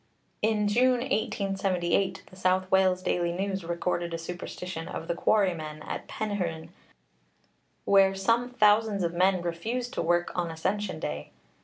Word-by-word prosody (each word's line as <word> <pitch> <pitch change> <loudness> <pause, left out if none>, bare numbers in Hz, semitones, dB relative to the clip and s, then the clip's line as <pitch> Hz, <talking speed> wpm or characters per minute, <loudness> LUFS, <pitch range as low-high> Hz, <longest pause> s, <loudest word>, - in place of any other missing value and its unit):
In 210 -1 +2
June, 245 +3 +3
1878, 195 -6 0
the - - -16
South 185 0 +1
Wales 185 -1 +3
Daily 175 -2 0
News 190 +1 -2
recorded 170 0 -2
a - - -2
superstition 175 0 -6
of 165 - -6
the - - 0
quarrymen 170 -6 0
at - - -5
Penrhyn, 175 -7 -3 1.2
where 195 -1 +5
some 230 +5 +1
thousands 210 -4 +3
of 170 0 -1
men 185 0 +2
refused 225 +9 -3
to - - -1
work 175 +1 +1
on 175 -1 -1
Ascension 185 +2 -2
Day. 75 - -4
185 Hz, 140 wpm, -28 LUFS, 170-205 Hz, 1.2 s, where